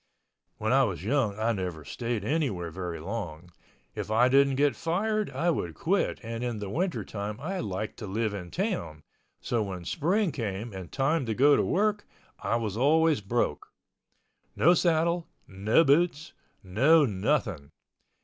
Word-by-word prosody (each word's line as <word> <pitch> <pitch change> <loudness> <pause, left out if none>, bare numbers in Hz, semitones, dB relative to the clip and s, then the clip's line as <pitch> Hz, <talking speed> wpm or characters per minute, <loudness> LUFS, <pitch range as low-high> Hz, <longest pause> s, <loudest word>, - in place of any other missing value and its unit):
When 110 +3 0
I 135 0 +5
was 95 - -2
young 110 -3 0
I 110 +2 +1
never 90 -7 -4
stayed 115 - -3
anywhere 115 - -1
very 90 -1 -5
long. 90 -3 -6 0.4
If - - -5
I 115 +4 +4
didn't 135 0 +4
get 140 -2 +2
fired, 210 - -1
I 175 +1 0
would 85 - -3
quit 190 +4 0
and 115 +1 -5
in 120 -2 -2
the 100 -2 -5
winter 155 - -1
time 105 +1 -5
I 185 +7 -3
liked 105 0 -4
to 105 - -7
live 110 +2 -1
in 90 -3 -6
town, 85 - -3 0.4
so 120 -2 0
when 95 -4 -5
spring 180 - +1
came 110 -3 -4
and 95 -3 -8
time 135 0 0
to 110 - -1
go 145 +4 +6
to - - +2
work, 205 +2 0 0.3
I - - -1
was 110 -4 -2
always 155 +2 +3
broke. 100 -7 -1 0.9
No 175 +4 +5
saddle, 170 0 +1 0.2
no 100 +10 +3
boots, 155 +1 +2 0.3
no 135 - +4
nothing. 105 - -1
115 Hz, 160 wpm, -28 LUFS, 100-155 Hz, 0.9 s, go